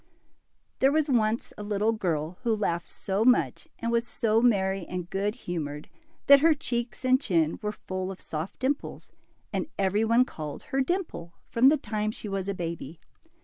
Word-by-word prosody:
T 265 - +5
HEEE - - +3
was 310 -2 +2
once 225 -1 +1
a - - -4
little 210 +1 +1
girl 170 -6 -2
who 235 -3 +1
laughed 175 -5 -1
so 195 +2 -1
much 250 +1 +3
and 230 0 -2
was 235 0 +1
so 225 0 +1
merry 195 -5 +2
and 180 -1 -4
good 200 +3 -1
humored, 150 - -5 0.4
that 280 0 +9
her 320 +2 +5
cheeks 240 -5 -3
and 255 +1 +4
chin 165 - +1
were 210 - -1
full 185 -2 -5
of 190 - -9
soft 160 +4 -5
dimples, 275 +3 -3 0.4
and - - -1
every 200 +2 +2
one 230 +3 +4
called 155 - -7
her 270 - -1
Dimple 260 - -3 0.2
from 250 +3 +6
the 305 - +4
time 215 -4 -2
she 215 - -6
was 195 -1 -2
a 200 - -1
baby. 165 -3 -5
210 Hz, 185 wpm, -27 LUFS, 180-245 Hz, 0.4 s, that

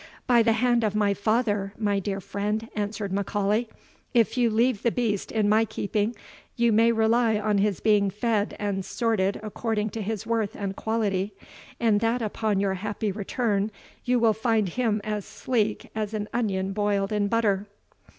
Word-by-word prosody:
"By 240 -2 +5
the 225 0 +3
hand 240 +1 +2
of 210 -1 0
my 205 -1 +2
father, 205 -1 0
my 205 -2 +1
dear 195 0 -3
friend," 210 +3 -3
answered 205 -1 -3
M'Aulay, 205 +3 0 0.5
"if 230 0 +3
you 245 -2 +3
leave 230 0 +2
the 235 - +3
beast 220 -5 -1
in 215 -2 +1
my 215 +2 +4
keeping, 215 +1 -2 0.4
you 235 -1 +3
may 230 +2 +5
rely 225 0 +3
on 210 -1 +1
his 200 -1 +1
being 205 -2 +3
fed 210 +1 -1
and 200 -2 -2
sorted 200 -3 0
according 215 0 -2
to 225 - -4
his 215 0 -3
worth 225 -2 -1
and 195 -1 -4
quality, 205 -3 -1 0.4
and 220 -3 +3
that 230 +2 0
upon 215 -1 0
your 195 -1 +1
happy 205 +2 -3
return, 205 0 -1 0.3
you 250 0 +2
will 225 -2 +4
find 220 -2 +1
him 220 0 0
as 210 -1 -2
sleek 215 -2 -2
as 215 0 -3
an 210 -1 -3
onion 195 -5 -1
boiled 205 -1 0
in 205 -1 +1
butter." 205 -2 +1
215 Hz, 170 wpm, -26 LUFS, 200-225 Hz, 0.5 s, By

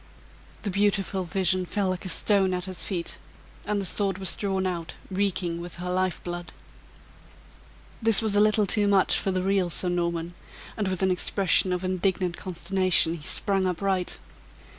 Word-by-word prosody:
The 205 - -1
beautiful 195 -1 +1
vision 185 +1 +1
fell 195 +1 -1
like 185 0 -3
a - - -3
stone 190 0 +2
at 180 0 -3
his 185 -2 -3
feet, 175 -3 -4 0.5
and 210 0 0
the 195 - -3
sword 195 0 +1
was 190 -2 -2
drawn 190 -2 -1
out 170 -3 -3 0.2
reeking 185 -3 -1
with 175 0 -7
her 180 +1 -4
life 185 -1 -1
blood. 175 0 -6 1.5
This 225 -2 +4
was 220 -2 0
a 205 - +5
little 215 0 +4
too 205 +1 +2
much 195 -2 +4
for - - -2
the 185 -1 0
real 190 -2 +1
Sir 180 +1 +3
Norman, 170 -1 -1 0.4
and 210 -3 -1
with 185 0 -1
an 190 - +3
expression 185 0 +2
of 180 0 -1
indignant 185 -1 0
consternation, 185 -1 +2
he 170 - -7
sprang 190 +5 -1
upright. 185 0 -1
185 Hz, 170 wpm, -26 LUFS, 175-195 Hz, 1.5 s, a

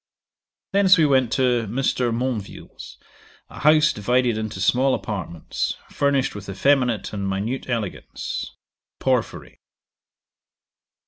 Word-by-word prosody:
'Thence 195 -1 +5
we 160 - +4
went 130 -4 +2
to 125 -4 +1
Mr. 125 +1 0
Monville's, 115 -3 -5 0.5
a - - -10
house 155 +1 +5
divided 120 +3 +1
into 110 -2 -4
small 130 +7 +3
apartments, 90 -6 -4 0.2
furnished 140 -2 +1
with 105 -1 -9
effeminate 120 0 +1
and 100 -1 -3
minute 110 +8 -3
elegance. 115 -6 -4 0.4
Porphyry. 130 -3 -2
125 Hz, 105 wpm, -23 LUFS, 105-135 Hz, 0.5 s, Thence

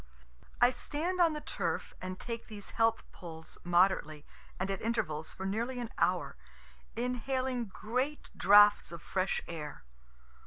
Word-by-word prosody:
I 245 +1 +6
stand 335 +8 -2
on 335 -2 +5
the 300 - -4
turf - - -3
and 185 0 -5
take 230 -1 -5
these 210 -3 -9
health 225 0 +2
pulls 160 -2 -9
moderately 175 -4 +2 0.3
and 190 +2 -1
at 195 - -3
intervals 160 -9 -1
for 190 - -6
nearly 235 +6 -1
an 235 -2 -5
hour, - - +1 0.6
inhaling 250 +1 -1
great 250 +8 -3
draughts 205 0 +6
of 170 -1 -8
fresh 185 0 0
air. 150 - -6
215 Hz, 140 wpm, -32 LUFS, 185-250 Hz, 0.6 s, I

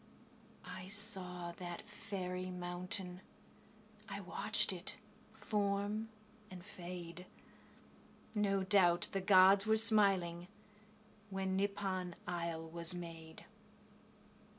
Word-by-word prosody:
I 180 - -9
saw 190 -4 +3
that 175 +1 -8
fairy 185 -3 -6
mountain.... 180 +1 -5 0.9
I - - -6
watched - - -1
it - - -5 0.3
form 205 +1 -3 0.4
and 185 -1 -11
fade. 180 -2 -9 1.1
No 200 -3 0
doubt 185 -3 +2
the 195 - -3
gods 195 +1 +5
were 220 0 +3
smiling, 195 -6 +6 0.8
When 190 -1 -3
Nippon 190 -3 -3
isle 170 -2 -5
was 170 +1 -2
made. 165 -2 -10
185 Hz, 90 wpm, -35 LUFS, 175-200 Hz, 1.1 s, smiling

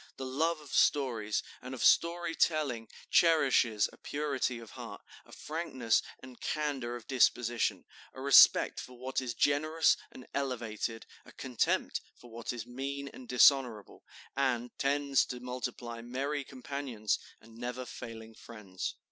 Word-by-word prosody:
The 130 - -5
love 155 +5 0
of 150 -2 -12
stories 115 -7 +2 0.2
and 130 +1 -6
of 120 - -4
story 170 -1 +3
telling 140 -10 +1 0.2
cherishes 135 -10 +4
a - - -15
purity 140 -4 -2
of 115 -2 -11
heart, - - -9 0.2
a - - -17
frankness 130 -8 -1 0.2
and 130 -1 -13
candor 140 -6 -2
of 120 -2 -9
disposition, 120 -2 +1 0.3
a - - -9
respect 140 +1 +7
for 125 -1 -9
what 130 +2 -2
is 120 -2 -4
generous 155 +5 +3
and 130 - -12
elevated, 115 -4 -3 0.2
a - - -15
contempt 125 -4 -1
for 120 - -16
what 115 0 -5
is 120 -2 -6
mean 140 +3 -5
and 130 - -12
dishonorable, 125 -4 +4 0.3
and 125 -3 0
tends 140 -1 +2
to 125 - -5
multiply 120 -1 -5
merry 135 +4 -3
companions 130 -5 -3 0.2
and 115 +1 -17
never 125 +1 -4
failing 115 -2 -9
friends." 105 -5 -7
130 Hz, 140 wpm, -31 LUFS, 115-140 Hz, 0.3 s, respect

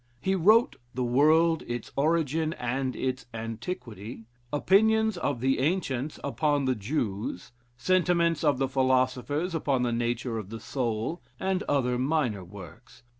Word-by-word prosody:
He 190 +9 0
wrote 215 +6 +4 0.2
"The 130 - -1
World: 155 +6 +4
its 120 -1 -5
Origin 155 +1 +1
and 130 0 -2
its 130 -1 -3
Antiquity," 115 - -6 0.3
"Opinions 220 +7 +3
of 145 -8 -2
the 135 0 +2
Ancients 145 -2 -1
upon 145 0 0
the 130 - +2
Jews," 105 - -3 0.3
"Sentiments 170 0 +2
of 145 -4 +3
the 135 0 +1
Philosophers 130 +5 +1
upon 140 -5 0
the 120 -1 0
Nature 120 0 -1
of 100 -3 -8
the 115 +1 -6
Soul," 120 +6 -2 0.2
and 190 -1 0
other 125 -3 +1
minor 130 - 0
works. 105 +6 -13
135 Hz, 135 wpm, -28 LUFS, 120-160 Hz, 0.3 s, wrote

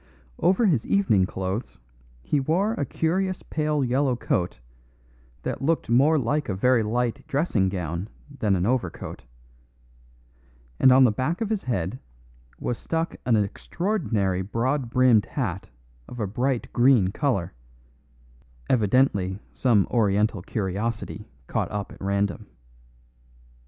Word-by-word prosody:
Over 185 +7 +3
his 150 - +2
evening 105 - +3
clothes 95 +6 -4 0.5
he 145 - +1
wore 175 +10 +1
a 145 - -2
curious 185 +6 -1
pale 150 -2 -1
yellow 130 +1 +1
coat 90 -6 -1 0.9
that - - -3
looked 150 -4 0
more 140 +6 +5
like 145 +2 -1
a 95 - -1
very 125 +4 +3
light 115 +2 -1
dressing 135 - +1
gown 90 +1 -4 0.3
than 105 -4 +2
an 90 0 0
overcoat, 110 - -3 1.5
and 130 - +7
on 130 +1 +7
the 125 - +5
back 130 +11 -2
of 225 -1 -2
his 215 -3 0
head 105 -1 -2 0.6
was 120 - -3
stuck 165 0 -2
an 120 - +4
extraordinary 105 - -1
broad 120 +6 -1
brimmed 120 -3 +4
hat 100 - -3 0.4
of 125 - -9
a 105 - 0
bright 120 +5 -2
green 120 -6 +4
colour, 105 - -1 1.2
evidently 105 -5 +2 0.2
some 115 -7 +3
oriental 105 -3 +2
curiosity 105 +2 -3 0.2
caught - - -2
up 105 -1 -4
at - - -14
random. 100 +1 -1
120 Hz, 125 wpm, -25 LUFS, 100-140 Hz, 1.5 s, and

